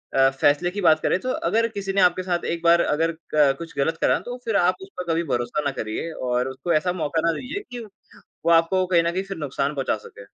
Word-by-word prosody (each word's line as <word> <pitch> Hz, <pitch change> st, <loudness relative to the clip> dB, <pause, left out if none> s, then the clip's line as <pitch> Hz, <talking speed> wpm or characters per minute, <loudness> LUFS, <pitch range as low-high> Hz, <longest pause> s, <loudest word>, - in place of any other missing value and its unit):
अ, 135 Hz, 0 st, +5 dB
फ़ैसले 145 Hz, +5 st, +2 dB
की 205 Hz, +1 st, -4 dB
बात 155 Hz, -3 st, +5 dB
करें, 185 Hz, -, +1 dB
तो 255 Hz, -, -4 dB, 0.2 s
अगर 230 Hz, +1 st, +2 dB
किसी 200 Hz, -3 st, -5 dB
ने 195 Hz, -, +3 dB
आपके 180 Hz, +1 st, +3 dB
साथ 175 Hz, -2 st, -2 dB
एक 170 Hz, 0 st, -3 dB
बार 170 Hz, 0 st, +5 dB
अगर 165 Hz, +2 st, +1 dB, 0.2 s
क 140 Hz, -3 st, +4 dB
कुछ 165 Hz, -2 st, -9 dB
गलत 160 Hz, +4 st, 0 dB
करा, -, -, +3 dB
तो 245 Hz, +1 st, -7 dB
फिर 225 Hz, -3 st, -1 dB
आप 180 Hz, +1 st, +3 dB
उस 190 Hz, -, -10 dB
पर 175 Hz, -2 st, -3 dB
कभी 170 Hz, +1 st, 0 dB
भरोसा 120 Hz, +4 st, -1 dB
ना 140 Hz, -, +1 dB
करिए 110 Hz, +10 st, -4 dB, 0.2 s
और 125 Hz, +1 st, +1 dB
उसको 165 Hz, +6 st, -2 dB
ऐसा 180 Hz, +4 st, +1 dB
मौका 160 Hz, -2 st, -1 dB
ना -, -, +4 dB
दीजिए 345 Hz, +11 st, -5 dB
कि 245 Hz, -, -6 dB, 0.7 s
वो -, -, +4 dB
आपको 175 Hz, +3 st, +3 dB
कहीं 175 Hz, -2 st, +3 dB
न 170 Hz, -, 0 dB
कहीं 185 Hz, -, -1 dB
फिर 195 Hz, 0 st, -6 dB
नुकसान 145 Hz, 0 st, -2 dB
पहुँचा 135 Hz, -5 st, -1 dB
सके। 100 Hz, -, -13 dB
170 Hz, 250 wpm, -23 LUFS, 145-185 Hz, 0.7 s, अ